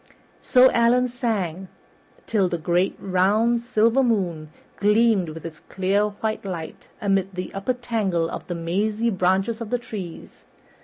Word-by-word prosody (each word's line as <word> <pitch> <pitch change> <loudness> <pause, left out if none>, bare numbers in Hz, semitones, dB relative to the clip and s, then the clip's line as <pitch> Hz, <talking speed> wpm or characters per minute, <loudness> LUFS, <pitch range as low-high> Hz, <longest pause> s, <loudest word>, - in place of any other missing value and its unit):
So 255 +1 +5
Allan 245 +2 +3
sang 200 -8 -2 0.6
till 200 -5 +1
the 170 - -2
great 175 +3 0
round 205 +6 +2
silver 230 +2 +2
moon 180 -11 0 0.3
gleamed 210 -3 +3
with 160 +1 -9
its 160 -1 -8
clear 195 +2 +1
white 215 +1 -4
light 175 -5 -7
amid 195 -2 0
the 180 0 -5
upper 195 +6 -1
tangle 210 -9 -1
of - - -7
the 175 - -3
mazy 210 +7 0
branches 195 +4 0
of 225 - -5
the 245 - +1
trees. 200 -8 -9
200 Hz, 145 wpm, -23 LUFS, 180-230 Hz, 0.6 s, So